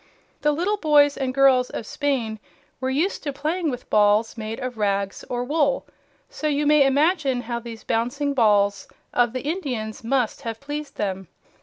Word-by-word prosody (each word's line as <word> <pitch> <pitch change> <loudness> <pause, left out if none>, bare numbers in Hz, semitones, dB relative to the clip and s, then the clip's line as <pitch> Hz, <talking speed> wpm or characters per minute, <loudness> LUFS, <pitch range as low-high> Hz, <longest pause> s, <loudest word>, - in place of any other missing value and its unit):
The 295 - +3
little 360 +8 0
boys 295 -4 +4
and 265 -2 -2
girls 260 -1 +4
of 230 - -5
Spain 240 -6 -2 0.4
were 260 0 -1
used 310 +9 0
to 290 - -3
playing 315 +4 -1
with 250 -3 -6
balls 210 +1 +3
made 225 +1 -5
of 255 -1 -4
rags 200 -1 -1
or 245 0 -1
wool, 285 +1 +1 0.4
so - - -4
you 295 0 +1
may 295 -2 +5
imagine 285 -2 +2
how 235 0 -4
these 230 -1 -9
bouncing 275 +5 -1
balls 205 -5 +2 0.3
of 240 -1 +3
the 255 +1 -4
Indians 265 - -3
must 250 0 0
have 230 -3 -5
pleased 290 +1 -6
them. 190 -2 -3
260 Hz, 170 wpm, -23 LUFS, 225-290 Hz, 0.4 s, may